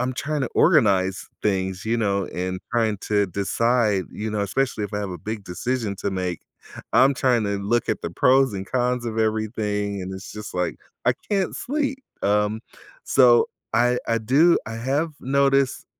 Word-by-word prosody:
I'm 125 +1 0
tryna 140 -1 -2
organize 100 - +3 0.2
things, 95 -2 -1
you 115 +1 +1
know? 100 -3 0
And 90 +1 -4
trying 110 -4 +1
to 105 -1 +1
decide, 100 +2 +1
you 110 +1 -4
know, 105 -1 -2
especially 110 +1 -1
if 100 - -7
I 105 - -1
have 100 -2 -4
a 90 - -5
big 105 +4 -5
decision 105 +3 -3
to 100 - -3
make, 90 -2 -3 0.5
I'm 135 +1 +5
tryna 110 -6 +1
look 120 +2 +1
at - - -1
the 85 - -3
pros 130 +7 +3
and 95 0 -5
cons 125 -1 0
of 110 -1 -3
everything 105 -2 -1
and 95 +1 -6
it's 95 +1 -9
just 105 -2 -8
like, 90 -1 -1 0.3
I - - +4 0.2
can't 195 -2 0
sleep. 275 -1 -2 0.2
Um, 105 +2 +1 0.4
so 125 -3 +5 0.3
I 120 0 +3
I 115 0 +2
do 140 +10 +4
I 115 - -5
have 140 +7 -1
noticed 135 0 +1
110 Hz, 175 wpm, -23 LUFS, 100-130 Hz, 0.5 s, I'm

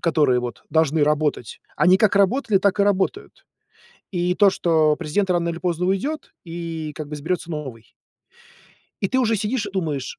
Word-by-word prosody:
которые 150 -7 +2
вот 120 -2 -6
должны 160 -1 +2
работать, 150 -6 -1 0.2
они 185 +1 +5
как 210 -2 +3
работали, 215 +2 +2
так 200 +1 +1
и - - +6
работают. 200 - -1 0.7
И 180 -1 0
то, 205 0 +5
что 160 -4 +2
президент 190 +6 -1
рано 170 -1 +1
или 170 0 -5
поздно 175 -1 -1
уйдет 235 +12 -2
и 165 -2 -5
как 155 -2 -6
бы - - -7
изберется 165 +3 -3
новый. 135 -8 -7 1.1
И 195 - 0
ты 260 - 0
уже 230 -3 +2
сидишь 215 +3 -2
и - - -6
думаешь, 155 -8 -3
175 Hz, 170 wpm, -22 LUFS, 155-200 Hz, 1.1 s, и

